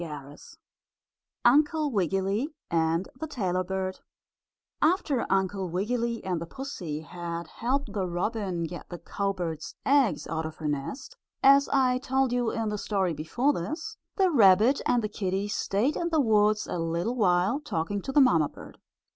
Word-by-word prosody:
STORY 160 -3 -5 0.2
XXXI - - -15 1.0
UNCLE 295 +4 +4
WIGGILY 195 - 0 0.2
AND 165 +2 +1
THE 315 - -4
TAILOR 185 - -1
BIRD 190 0 -3 0.8
After 305 -6 +2
Uncle 190 -1 0
Wiggily 230 +6 -1
and 180 -3 -1
the 170 - -5
pussy 175 - -5
had 170 +1 -6
helped 245 - -2
the 195 -3 -1
robin 185 0 -2
get 175 +2 -7
the 175 - -6
cowbird's 180 -5 -3
eggs 275 -6 +3
out 160 -1 -3
of 155 - -9
her 155 - -5
nest, 255 - -4 0.3
as 275 +1 +6
I 255 -2 +3
told 265 -1 0
you 245 -2 +1
in 225 -1 -2
the 210 -1 -3
story 195 -5 0
before 240 - 0
this, 315 - -4 0.2
the 380 -3 +3
rabbit 220 - +5
and 240 -2 +2
the - - 0
kittie 195 -1 -2
stayed 210 +8 0
in 340 - -1
the 320 -2 +2
woods 215 -4 +3
a 175 - -4
little 170 +8 -1
while 190 +2 +2
talking 200 - -3
to 270 - -5
the 285 - +5
mamma 165 - +4
bird. - - -13
205 Hz, 165 wpm, -27 LUFS, 175-260 Hz, 1.0 s, as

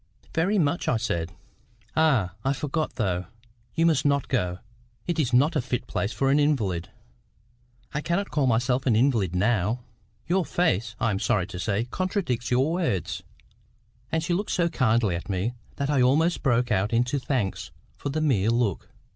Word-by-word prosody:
"Very 185 +6 +2
much," 165 -1 +1
I 120 - +3
said. 85 -7 -2 0.6
"Ah! 135 - +3
I 135 - +2
forgot, 150 -1 -2
though. 95 -6 -1 0.5
You 165 - +3
must 155 -5 +3
not 140 -1 +1
go; 90 -9 0 0.5
it 170 -2 -1
is 130 -6 +1
not 145 +7 +4
a 145 - +2
fit 125 0 -3
place 100 - -2
for 135 +1 +1
an 145 - +4
invalid." 105 - 0 1.0
"I 150 - -1
cannot 180 +6 -1
call 145 -3 +1
myself 125 +3 +1
an 115 - +4
invalid 110 - +2
now." 105 +3 +1 0.4
"Your 185 +2 +2
face, 115 - 0
I 115 - +1
am 95 - -1
sorry 100 -3 +1
to 90 -1 -8
say, 100 +4 0
contradicts 170 - -2
your 130 +5 +2
words." 165 - -1 0.9
And 160 0 0
she 175 - 0
looked 200 +4 -1
so 170 -1 +1
kindly 115 - +2
at 85 - -6
me, 100 +5 -1 0.2
that 140 +1 -1
I 140 -3 +3
almost 155 +7 +3
broke 125 -3 +2
out 100 +1 +1
into 125 +4 +1
thanks 125 -8 -2 0.3
for - - -4
the 155 +3 -1
mere 115 -9 +2
look. 115 -5 0
125 Hz, 175 wpm, -26 LUFS, 105-155 Hz, 1.0 s, not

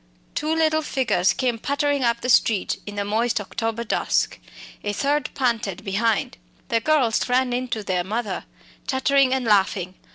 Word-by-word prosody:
Two 305 +1 -1
little 315 -1 +2
figures 255 - +1
came 245 -3 -1
pattering 285 +1 0
up 235 -1 +1
the - - -3
street 215 -5 +3
in 205 - -6
the 200 0 -2
moist 225 +3 0
October 225 +3 -3
dusk, 230 - 0 0.4
a 205 - -2
third, 285 +4 0
panted 230 -8 -1
behind. 210 - 0 0.3
The 230 - +2
girls 255 -4 +2
ran 250 0 +2
in 250 +1 -1
to 220 -3 -3
their 185 -3 0
mother 210 +1 -3 0.4
chattering 270 0 +3
and 260 -1 0
laughing. 190 -3 +2
235 Hz, 160 wpm, -23 LUFS, 205-265 Hz, 0.4 s, street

